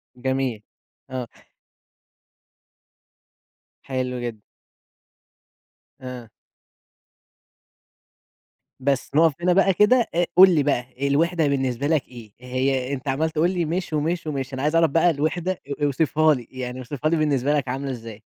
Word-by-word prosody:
جميل، 130 Hz, -3 st, -2 dB, 0.5 s
آه. 125 Hz, -2 st, -4 dB, 2.6 s
حلو 130 Hz, -1 st, -3 dB
جدًا. 115 Hz, -3 st, -6 dB, 1.6 s
آه. 125 Hz, -3 st, -8 dB, 2.5 s
بس، 135 Hz, 0 st, -1 dB
نقف 160 Hz, -1 st, +5 dB
هنا 180 Hz, 0 st, +3 dB
بقى 195 Hz, 0 st, +4 dB
كده، 230 Hz, +5 st, +4 dB
أ 175 Hz, -, +3 dB
قُل 190 Hz, +1 st, +9 dB
لي 145 Hz, -, +3 dB
بقى 130 Hz, 0 st, -1 dB
الوِحدة 165 Hz, +2 st, +2 dB
بالنسبة 135 Hz, -1 st, -1 dB
لك 155 Hz, -3 st, +1 dB
إيه؟ 115 Hz, -4 st, -12 dB
هي 130 Hz, +1 st, -1 dB
أنت 135 Hz, +1 st, -6 dB
عمّال 150 Hz, +4 st, 0 dB
تقول 160 Hz, +3 st, +1 dB
لي 175 Hz, -3 st, -1 dB
مش 170 Hz, 0 st, -3 dB
ومش، 160 Hz, +2 st, -1 dB
ومش، 135 Hz, -2 st, -4 dB
أنا 130 Hz, -, -4 dB
عايز 150 Hz, +3 st, 0 dB
أعرف 165 Hz, -1 st, +4 dB
بقى 165 Hz, +4 st, +3 dB
الوِحدة 165 Hz, +4 st, -1 dB
أ 145 Hz, -5 st, -6 dB
اوصفها 155 Hz, +2 st, +3 dB
لي، 120 Hz, -4 st, -6 dB
يعني 130 Hz, -1 st, -6 dB
اوصفها 145 Hz, +4 st, -3 dB
لي 165 Hz, -, +1 dB
بالنسبة 145 Hz, -2 st, +1 dB
لك 145 Hz, -3 st, 0 dB
عاملة 135 Hz, +2 st, -3 dB
إزاي؟ 115 Hz, -3 st, -8 dB
140 Hz, 135 wpm, -23 LUFS, 130-160 Hz, 2.6 s, قُل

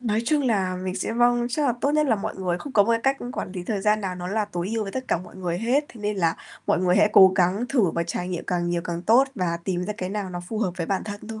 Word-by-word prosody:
Nói 225 Hz, -2 st, 0 dB
chung 300 Hz, 0 st, +2 dB
là 190 Hz, -7 st, +1 dB
mình 185 Hz, 0 st, -4 dB
sẽ, 225 Hz, -, -2 dB
vâng 240 Hz, 0 st, +3 dB
chắc 290 Hz, +4 st, 0 dB
là 250 Hz, -, +3 dB
tốt 285 Hz, -, +2 dB
nhất 305 Hz, -1 st, +3 dB
là 225 Hz, -, +3 dB
mọi 215 Hz, +2 st, -4 dB
người 180 Hz, -2 st, -1 dB
không 285 Hz, -, -8 dB
có 205 Hz, -, +6 dB
một 230 Hz, -, 0 dB
cái 230 Hz, -, +2 dB
cách 270 Hz, 0 st, +2 dB, 0.2 s
quản 185 Hz, -, -5 dB
lý 180 Hz, -2 st, -5 dB
thời 205 Hz, -1 st, -2 dB
gian 210 Hz, +1 st, +2 dB
nào 190 Hz, -3 st, -3 dB
nó 180 Hz, 0 st, -6 dB
là 215 Hz, +2 st, 0 dB
tối 180 Hz, -2 st, -4 dB
ưu 225 Hz, -, 0 dB
với 195 Hz, -, -5 dB
tất 260 Hz, 0 st, -3 dB
cả -, -, +2 dB
mọi 180 Hz, +1 st, -12 dB
người 175 Hz, -2 st, -2 dB
hết, 260 Hz, +6 st, +1 dB
thế 230 Hz, -, -13 dB
nên 210 Hz, 0 st, -2 dB
là 165 Hz, -3 st, +2 dB, 0.3 s
mọi -, -, +2 dB
người 180 Hz, 0 st, +3 dB
hãy 210 Hz, +1 st, +5 dB
cố 190 Hz, -1 st, +8 dB
gắng 190 Hz, +6 st, +2 dB
thử 220 Hz, -, +2 dB
và 170 Hz, -, -1 dB
trải 175 Hz, +1 st, -4 dB
nghiệm 175 Hz, -2 st, -4 dB
càng 175 Hz, -1 st, -1 dB
nhiều 175 Hz, -1 st, -1 dB
càng 170 Hz, 0 st, -4 dB
tốt 240 Hz, +7 st, +5 dB
và 170 Hz, -4 st, -1 dB
tìm 180 Hz, -2 st, -1 dB
ra 210 Hz, -, -3 dB
cái 185 Hz, -, -4 dB
nào 200 Hz, -2 st, -4 dB
nó 175 Hz, 0 st, -5 dB
phù 220 Hz, -, -3 dB
hợp 200 Hz, -5 st, 0 dB
với 165 Hz, -2 st, -3 dB
bản 195 Hz, -, -1 dB
thân 205 Hz, +1 st, -7 dB
thôi. 220 Hz, -1 st, -6 dB
200 Hz, 320 wpm, -24 LUFS, 180-230 Hz, 0.3 s, cố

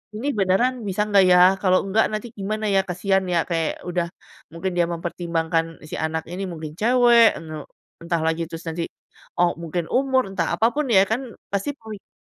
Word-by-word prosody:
"Ini 235 Hz, +6 st, -4 dB
beneran 210 Hz, +6 st, +1 dB
bisa 195 Hz, +2 st, 0 dB
gak 200 Hz, -2 st, +5 dB
ya? 180 Hz, 0 st, +6 dB, 0.2 s
Kalau 185 Hz, -1 st, +3 dB
enggak 210 Hz, +3 st, +2 dB
nanti 215 Hz, +3 st, -4 dB
gimana 215 Hz, +2 st, -3 dB
ya? 195 Hz, -1 st, +4 dB
Kasian 190 Hz, +2 st, 0 dB
ya." 170 Hz, -2 st, +1 dB
Kayak 165 Hz, -2 st, -1 dB
udah, 175 Hz, -1 st, -1 dB, 0.5 s
mungkin 175 Hz, +3 st, -3 dB
dia 175 Hz, -, +4 dB
mempertimbangkan 165 Hz, -1 st, -2 dB
si -, -, -5 dB
anak 160 Hz, 0 st, -2 dB
ini 190 Hz, +2 st, -4 dB
mungkin 155 Hz, -3 st, -7 dB
cewek, 235 Hz, 0 st, +5 dB
ene 155 Hz, -2 st, -8 dB, 0.4 s
entah 170 Hz, -1 st, -1 dB
lagi 160 Hz, +1 st, 0 dB
terus 165 Hz, +1 st, -7 dB
nanti, 165 Hz, +1 st, -3 dB, 0.6 s
oh 175 Hz, -1 st, +3 dB
mungkin 170 Hz, 0 st, -3 dB
umur, 260 Hz, -3 st, +2 dB
entah 170 Hz, -4 st, -1 dB
apa 225 Hz, +4 st, +4 dB
pun 300 Hz, -1 st, 0 dB
ya 190 Hz, -3 st, +7 dB
kan, 225 Hz, +4 st, 0 dB, 0.3 s
pasti 200 Hz, +8 st, -1 dB
pemikiran 220 Hz, -4 st, -11 dB
185 Hz, 180 wpm, -23 LUFS, 165-215 Hz, 0.6 s, ya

